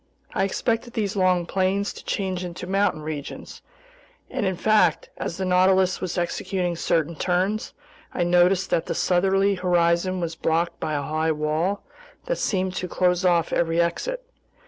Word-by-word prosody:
I - - +1
expected 230 +4 -1
these 210 -2 -1
long 185 -2 +2
plains 195 +3 0
to - - -11
change 185 -2 -2
into 175 0 -6
mountain 190 -4 0
regions, 150 -2 -7 0.7
and 200 - -1
in 190 - 0
fact, 210 -7 +2
as 170 - -4
the 190 - -2
Nautilus 185 0 +3
was 185 - -3
executing 180 0 -1
certain 165 0 0
turns, 185 +6 -1 0.4
I 175 - -1
noticed 180 +2 +3
that 165 - +1
the - - -2
southerly 195 +2 +2
horizon 180 0 +1
was 170 -1 -2
blocked 165 +1 0
by 155 - -2
a 145 - -1
high 155 +2 0
wall 155 +6 -1 0.4
that - - -2
seemed 190 -3 0
to 180 - -2
close 180 0 +1
off 175 -3 +2
every 165 0 +1
exit. 485 - -1
180 Hz, 160 wpm, -24 LUFS, 170-190 Hz, 0.7 s, Nautilus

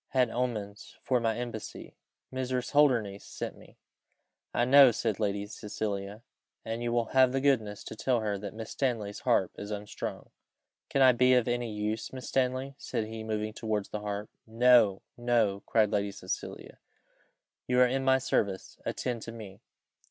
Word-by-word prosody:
had 125 -3 +2
omens 110 -4 -4
for 125 -2 +2
my 115 -1 0
embassy. 120 -3 -6 0.4
Mrs. 130 -1 -2
Holdernesse 120 -9 +3
sent - - -6
me." - - -17 0.7
"I 120 - +1
know," 135 +1 +8
said 110 -3 -1
Lady 100 -1 -1
Cecilia, 105 0 -5 0.4
"and 115 +1 -3
you 120 0 -1
will 120 -1 0
have 130 -1 +6
the 135 - 0
goodness 110 -7 +1
to - - -8
tell 120 +1 +1
her 105 -2 -1
that 100 0 -7
Miss 110 0 -7
Stanley's 115 -7 -2
harp - - +2
is 100 - -6
unstrung." 105 -1 -6 0.6
"Can 135 - +3
I 130 - +8
be 125 +1 +4
of 125 -1 +2
any 120 -1 -1
use, 105 +1 -3
Miss 130 -1 -7
Stanley?" 130 +1 0
said 110 - -2
he, 110 0 -7
moving 110 -1 -2
towards 105 -2 -2
the 105 - -4
harp. 105 0 -4 0.2
"No, 115 -3 +5
no," 115 -5 +1
cried 110 -2 +3
Lady 100 -1 0
Cecilia, - - -6 0.9
"you 125 0 +2
are 125 - +8
in 135 +2 0
my 130 0 +5
service, 100 -6 -1
attend 120 -2 -3
to 115 - -7
me." 105 -4 -10
115 Hz, 165 wpm, -30 LUFS, 105-125 Hz, 0.9 s, know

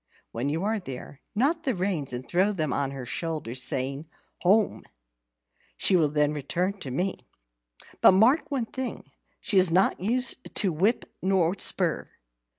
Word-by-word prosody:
When 120 +5 -2
you 160 +5 -2
are 215 +1 0
there, 135 -3 -9
knot 290 +9 +1
the 265 -7 -1
reins 180 -6 -2
and 125 +1 -6
throw 190 +4 +2
them 155 -8 -1
on 140 -1 -1
her 135 -2 -7
shoulder, 155 -2 -3
saying, 135 +3 -3 0.3
'Home!' 205 +4 +3 1.0
She 190 - +3
will 160 -4 +3
then 150 0 +1
return 180 +7 -2
to 135 - -6
me. 180 +9 -2 0.8
But - - +8
mark 230 - +4
one 270 -5 -1
thing, 260 +2 -6 0.3
she 195 - +2
is 185 -1 +7
not 185 +4 +2
used 245 +5 -1
to 190 -5 +1
whip 200 +10 +1 0.2
or 185 -3 +2
spur. - - +1
180 Hz, 155 wpm, -26 LUFS, 145-210 Hz, 1.0 s, But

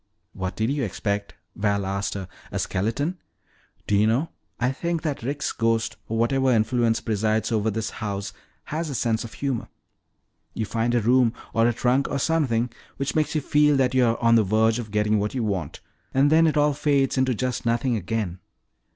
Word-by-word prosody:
"What 95 -1 -4
did 110 +4 0
you 140 -1 -1
expect," 100 0 -3 0.2
Val 100 -1 0
asked 100 0 -2
her, 95 -2 -5 0.2
"a - - -3
skeleton? 130 - -1 0.7
Do 105 - +1
you 105 +2 +4
know, 130 +9 +1 0.3
I 125 +1 +2
think 170 +3 -2
that 150 -4 -2
Rick's 140 +5 -2
ghost, 115 0 0
or 115 - -1
whatever 130 +3 +2
influence 115 0 +2
presides 110 +1 0
over 110 -1 +1
this 110 0 -3
house, 100 -2 -4 0.3
has 160 +1 -3
a 140 - -4
sense 115 -1 0
of 115 +1 -9
humor. 135 -4 -2 0.9
You 110 - -1
find 115 +4 0
a 120 - +3
room, 120 +1 +4 0.2
or 115 +1 +4
a - - +3
trunk, 125 +4 +1
or - - -1
something 130 -6 +1 0.3
which 140 +1 -2
makes 155 0 0
you 155 - +1
feel 150 +1 +3
that 130 -2 +2
you 130 -1 +4
are 115 -1 +2
on 115 0 +5
the 115 -1 +5
verge 110 +3 +2
of 115 -3 -6
getting 105 +1 +1
what 105 +5 -2
you 125 - 0
want, 95 -8 -3 0.3
and 140 +2 +4
then 165 +1 +6
it 155 - +1
all 150 0 +3
fades 140 -2 +1
into 130 -2 +2
just 125 +2 -2
nothing 120 +1 +1
again. 100 -2 -3
115 Hz, 195 wpm, -24 LUFS, 110-135 Hz, 0.9 s, then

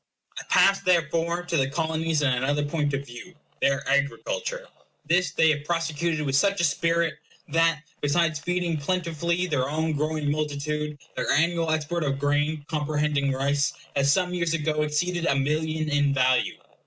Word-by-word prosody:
I - - -9
pass, 195 0 +5
therefore, 170 0 +1
to 170 -1 -1
the 135 -1 +1
Colonies 160 0 -1
in 140 - +3
another 145 +4 0
point 145 -1 -1
of 140 +1 -4
view, 140 +9 -11 0.3
their 140 0 +1
agriculture. - - -1 0.4
This 175 -1 +2
they 160 0 +3
have 145 -1 -2
prosecuted 165 -1 -1
with 135 -1 0
such 200 +7 +2
a - - +1
spirit, 170 +1 +1 0.3
that, 165 0 +2 0.2
besides 155 +1 +1
feeding 175 +1 -1
plentifully 170 +2 -1
their 140 -6 -1
own 160 +2 -1
growing 150 0 -1
multitude, 150 0 -2 0.2
their - - -2
annual 165 +2 +2
export 155 +2 -1
of 135 -2 -1
grain, 145 +1 0
comprehending 150 -2 0
rice, 140 +3 0 0.2
has 140 0 +3
some 180 +2 +1
years 170 -2 0
ago 150 -1 -1
exceeded 170 +3 0
a - - +3
million 155 +3 -1
in 145 -1 +2
value. 130 -1 +2
155 Hz, 160 wpm, -25 LUFS, 145-170 Hz, 0.4 s, pass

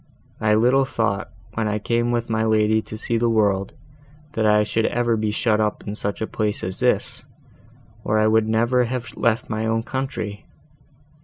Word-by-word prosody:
I 105 -1 +3
little 125 +5 +4
thought, 110 -5 -1 0.2
when 115 -1 -1
I 105 0 0
came 120 +2 0
with 120 -1 -1
my 110 -1 0
lady 110 0 +3
to 110 - -7
see 115 +1 -1
the 120 0 +2
world, 100 -3 +1 0.6
that 110 -1 +1
I 105 0 +4
should 110 +1 0
ever 120 -1 +1
be 110 -1 -1
shut 110 0 +1
up 105 -1 -2
in 100 - -4
such 100 -1 -3
a - - 0
place 105 -1 -2
as 95 0 -4
this, - - 0 0.8
or 110 - +1
I 110 - +3
would 110 0 +3
never 120 +3 +2
have 120 -3 -5
left 115 0 +1
my 110 0 -2
own 115 0 0
country! 120 -6 -4
110 Hz, 185 wpm, -22 LUFS, 105-115 Hz, 0.8 s, little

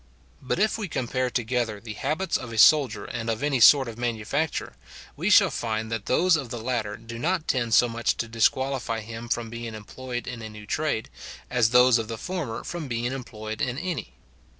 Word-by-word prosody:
But 130 - -2
if 215 +3 +1
we 210 - -3
compare 130 -3 -1
together 120 -3 -1
the 110 0 -7
habits 155 - -2
of 120 -2 -3
a 115 - -6
soldier 120 -3 +5
and 115 -1 -4
of 115 +3 -2
any 145 -3 +1
sort 135 +2 +7
of 115 0 -8
manufacturer, 120 +6 -2 0.4
we - - -1
shall - - +6
find 110 -1 -3
that 115 -2 -3
those 180 +6 +4
of 135 -6 -3
the 120 - -5
latter 110 -3 -2
do 115 0 -9
not 170 +3 0
tend 120 -3 +1
so 120 - +6
much 115 -1 -1
to 115 - -2
disqualify 115 +1 0
him 115 +2 -8
from 115 -1 -2
being 115 -1 -6
employed 120 +3 -6
in 120 -2 -6
a 110 - -6
new 105 -1 -11
trade, 150 -1 -1 0.4
as 120 -3 +3
those 125 0 +6
of 110 - -4
the 115 0 -5
former 160 -8 -4
from 170 -4 -5
being 120 -1 -2
employed 110 -4 -6
in 125 0 -1
any. 155 - -4
120 Hz, 200 wpm, -26 LUFS, 115-135 Hz, 0.4 s, sort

